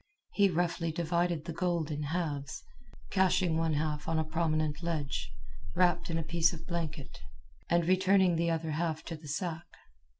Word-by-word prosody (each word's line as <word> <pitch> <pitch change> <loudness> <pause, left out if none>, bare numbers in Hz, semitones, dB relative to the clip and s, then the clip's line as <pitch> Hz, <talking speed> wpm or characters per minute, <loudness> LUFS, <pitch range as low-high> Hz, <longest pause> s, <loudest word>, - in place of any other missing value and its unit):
He 200 -1 +4
roughly 170 -1 0
divided 170 0 0
the 170 - -4
gold 170 -3 0
in 150 0 -2
halves, 145 -3 -3 0.5
caching 185 -2 +3
one 165 -1 +1
half 150 0 -1
on 165 0 +1
a 160 - +2
prominent 155 -1 0
ledge, 145 - -2 0.4
wrapped 180 -1 +3
in 165 - 0
a 165 - -1
piece 170 +2 +2
of 165 - -8
blanket, 160 -5 -4 0.5
and 170 -1 +3
returning 185 0 +4
the 170 +1 +1
other 165 -1 -1
half 160 0 -1
to 165 - -5
the 155 -1 -12
sack. 170 +2 -3
165 Hz, 165 wpm, -31 LUFS, 155-175 Hz, 0.5 s, He